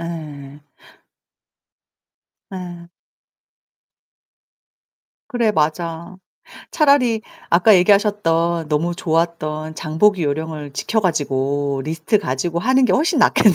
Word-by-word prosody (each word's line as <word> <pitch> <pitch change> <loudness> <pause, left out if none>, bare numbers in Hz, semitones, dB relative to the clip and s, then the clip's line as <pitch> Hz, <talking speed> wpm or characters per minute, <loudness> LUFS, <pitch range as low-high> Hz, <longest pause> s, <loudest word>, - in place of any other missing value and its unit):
예. 150 -4 -8 1.9
예. 175 -2 -8 2.4
그래 235 -5 0
맞아. 165 +2 -2 0.5
차라리 265 -7 +2 0.3
아까 185 +5 +5
얘기하셨던 175 -4 +2
너무 165 +3 -1
좋았던 160 -2 -2
장보기 170 +5 +1
요령을 150 0 -4
지켜 220 +10 -1
가지고 140 -5 -1
리스트 165 +7 0
가지고 165 +1 -2
하는 260 +7 +2
게 - - +2
훨씬 315 0 +1
낫겠네요. 210 -5 +4
170 Hz, 210 characters per minute, -19 LUFS, 155-205 Hz, 2.4 s, 아까